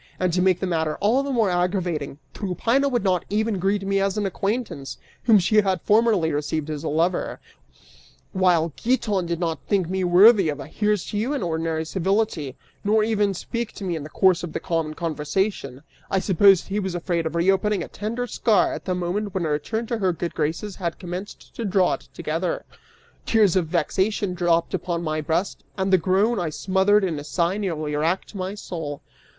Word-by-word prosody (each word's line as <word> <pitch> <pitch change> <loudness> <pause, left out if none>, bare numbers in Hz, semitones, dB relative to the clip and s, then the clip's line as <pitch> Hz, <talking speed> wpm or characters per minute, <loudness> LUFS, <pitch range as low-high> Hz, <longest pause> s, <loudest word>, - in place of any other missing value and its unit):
And 185 -2 +1
to 180 - +2
make 185 -1 +3
the - - -1
matter 160 -4 0
all 225 +7 +2
the 280 - -4
more 225 -7 +2
aggravating, 175 -5 -1 0.2
Tryphaena 230 +8 0
would 245 -5 0
not 185 -3 +1
even 215 -1 0
greet 195 +2 0
me 195 0 +1
as 195 +1 0
an 210 - 0
acquaintance, 195 - -3 0.3
whom 225 -3 +7
she 200 +3 +2
had 190 -3 +3
formerly 210 -6 +3
received 150 +1 -2
as 150 0 -5
a - - -2
lover, 170 +4 0 0.9
while 175 -4 +2
Giton 220 -7 0
did 170 -1 -2
not 165 -2 -1
think 190 -4 +1
me 190 0 -1
worthy 190 +1 +6
of 145 -1 -3
a 140 - -6
"Here's 210 +1 0
to 205 - -1
you" 245 +7 -1
in 280 - -2
ordinary 160 -1 -1
civility, 185 - -1 0.3
nor 215 +1 +3
even 210 -3 +1
speak 235 +5 -4
to 205 - -9
me 180 -3 -1
in 160 - -4
the 150 - -8
course 185 0 +3
of 175 -2 -6
the - - -2
common 160 -2 -2
conversation; 155 -3 -2 0.3
I 195 - +1
suppose 190 0 +5
he 200 +2 -2
was 190 -3 -3
afraid 170 -2 -1
of 160 - -6
reopening 190 +2 +2
a - - -7
tender 230 +4 -4
scar 220 -3 +2
at - - -7
the 185 - -1
moment 185 +3 -2
when 180 -3 0
a - - -1
return 220 +11 -2
to 230 0 -3
her 190 -3 +2
good 170 0 -4
graces 165 +6 -2
had 170 -3 -3
commenced 180 +2 -8
to 235 - -3
draw 190 -3 +2
it - - -6
together. 165 +2 -3 0.6
Tears 210 -6 +4
of 180 -4 +2
vexation 190 +5 0
dropped 170 -1 +1
upon 175 -1 -2
my 155 -1 -1
breast 165 +6 -2
and 190 0 0
the 185 - +6
groan 195 +7 +2
I 170 - -1
smothered 190 +7 +2
in 165 -6 -1
a - - -7
sigh 170 +5 0
nearly 155 -7 -2
wracked 165 +8 -1
my 190 0 -4
soul. 160 -8 -6
185 Hz, 200 wpm, -23 LUFS, 165-205 Hz, 0.9 s, whom